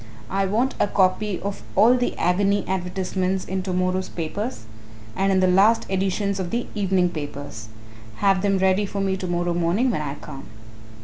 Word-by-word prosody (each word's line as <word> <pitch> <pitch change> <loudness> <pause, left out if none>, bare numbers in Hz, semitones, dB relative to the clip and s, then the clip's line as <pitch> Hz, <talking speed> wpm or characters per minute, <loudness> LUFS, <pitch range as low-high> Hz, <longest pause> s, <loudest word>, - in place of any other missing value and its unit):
"I 195 0 +1
want 235 +7 +1
a - - +3
copy 195 0 +1
of 200 +1 -4
all 235 +3 +6
the 245 -1 -1
agony 200 +3 +1
advertisements 185 0 -2
in 190 0 -2
to 185 0 -4
morrow's 185 +1 0
papers 175 - -4 0.5
and 195 +5 +1
in 190 -1 +3
the 185 - +4
last 200 +5 +4
editions 195 +1 0
of 180 -2 -3
the 240 +4 -1
evening 190 -3 +1
papers 145 -7 -7 0.5
have 195 - +2
them 200 -1 +2
ready 190 +2 +2
for 200 - -4
me 195 -1 0
tomorrow 175 -2 -1
morning 175 +9 +1
when 155 - -2
I 145 -2 -4
come." 135 -2 -10
190 Hz, 175 wpm, -23 LUFS, 180-200 Hz, 0.5 s, all